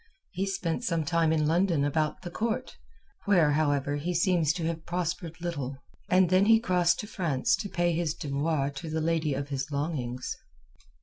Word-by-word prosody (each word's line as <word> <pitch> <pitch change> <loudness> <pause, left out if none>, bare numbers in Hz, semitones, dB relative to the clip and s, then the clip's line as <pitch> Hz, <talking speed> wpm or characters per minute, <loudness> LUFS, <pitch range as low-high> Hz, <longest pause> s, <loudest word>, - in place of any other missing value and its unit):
He 195 +2 -2
spent 195 +1 -2
some 165 -8 0
time 165 0 +2
in 155 -1 +2
London 165 -2 +2
about 150 +1 -1
the 175 - -6
Court, 225 +4 -2 0.5
where, 175 -7 +4
however, 145 -1 +1
he 175 +5 -2
seems 170 -3 +3
to 170 -2 -3
have 165 -1 -3
prospered 175 -1 -3
little, 145 -6 -4 0.3
and 185 -1 +4
then 185 +2 +5
he 225 +1 +6
crossed 180 -6 +2
to - - -7
France 170 - +1
to 200 - -5
pay 175 -1 +1
his 165 -1 -1
devoirs 145 -1 -1
to 165 +1 -6
the 160 +1 -1
lady 160 -2 0
of 140 +1 -4
his 135 0 -3
longings. 140 -4 -3
165 Hz, 180 wpm, -28 LUFS, 145-180 Hz, 0.5 s, he